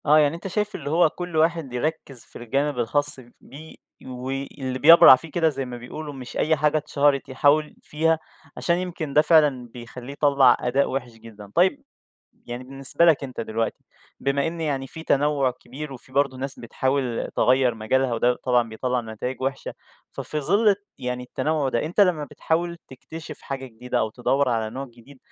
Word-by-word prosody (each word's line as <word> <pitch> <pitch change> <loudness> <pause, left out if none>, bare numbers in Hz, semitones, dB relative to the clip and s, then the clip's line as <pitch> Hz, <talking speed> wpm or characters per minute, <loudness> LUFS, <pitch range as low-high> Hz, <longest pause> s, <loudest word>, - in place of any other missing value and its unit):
آه 150 +1 +6
يعني 150 +1 +3
أنت 170 - -7
شايف 210 +2 -2
اللي - - -5
هو 165 +1 +4
كل 175 0 -5
واحد 160 -4 +1
يركّز 135 -1 -3
في - - -23
الجانب 135 +3 -1
الخاص 145 +4 0
ف 130 - -13 0.2
بيه 155 +3 -12 0.3
وي 130 +2 -5
اللي 130 -2 -4
بيّبرع 165 -2 +9
فيه 160 +4 -11
كده 165 0 +2
زي 135 -3 -4
ما 125 -1 -7
بيقولوا، 145 +5 -8
مش 130 -3 -8
أي 160 +1 +2
حاجة 150 +1 +2
اتشهرت 145 -2 +1
يحاول 145 +3 +2
فيها، 160 +1 0 0.4
عشان 170 0 +1
يمكن 175 -5 -4
ده 150 - +6
فعلًا 150 -6 +3
بيخلّيه 125 +2 -9
يطلّع 140 -3 +4
أداء 130 +3 +1
وحش 125 -2 -3
جدًا. 110 -3 -13
طيب، 190 +11 +3 0.6
يعني 120 +1 -6
بالنسبة 135 +5 0
لك 160 -5 +4
أنت 130 -3 -6
دلوقتي، 115 0 -3 0.4
بما 140 +1 0
إن 165 +1 -4
يعني 140 -4 -2
في 160 +4 -9
تنوّع 145 -3 +2
كبير 140 +3 -9
وفي 130 0 -12
برضه 140 -1 +1
ناس 135 +1 -5
بتحاول 130 0 -2
تغيّر 125 -1 +3
مجالها، 120 +3 0
وده 120 +2 +2
طبعًا 125 -2 +2
بيطلّع 125 +3 -2
نتايج 115 +3 -6
وحشة 135 +1 -3 0.4
ففي 155 - -4
ظِل 205 +10 +3
الت 205 0 +1
يعني 125 -1 -3
التنوّع 150 +3 -1
ده، 120 -2 -1
أنت 170 +6 -1
لمّا 180 -6 +3
بتحاول 170 +4 -2
تكتشف 155 +4 -10
حاجة 135 -1 -5
جديدة 125 +1 -4
أو 110 - 0
تدوّر 135 +4 0
على 110 -2 -1
نوع 130 +4 -5
جديد 120 +3 -17
135 Hz, 180 wpm, -24 LUFS, 125-155 Hz, 0.6 s, بيّبرع